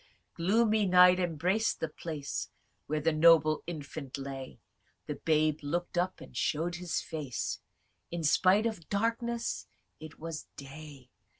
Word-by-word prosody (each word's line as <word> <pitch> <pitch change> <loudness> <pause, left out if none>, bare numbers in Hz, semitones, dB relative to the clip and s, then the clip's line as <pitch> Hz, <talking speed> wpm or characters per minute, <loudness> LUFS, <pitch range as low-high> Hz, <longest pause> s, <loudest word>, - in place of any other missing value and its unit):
Tityrus. - - -34
Gloomy 220 0 +4
night 180 0 +7
embrac'd 180 +5 0
the 160 - -1
place 150 -2 -5 0.4
Where 155 0 -1
the 165 +2 +2
noble 155 -1 +5
infant 145 -4 -6
lay: 135 -1 -7 0.5
The 150 - -3
babe 155 -1 +2
looked 170 +5 -3
up, 180 +1 0
and - - -13
show'd 165 +2 0
his 175 -1 -2
face, 150 -6 -4 0.5
In 170 -1 -4
spite 185 +7 +4
of 215 -8 -3
darkness 230 +2 -1 0.3
it 155 +1 -10
was 160 -1 -6
day. 140 -2 -11
165 Hz, 135 wpm, -31 LUFS, 150-180 Hz, 0.5 s, night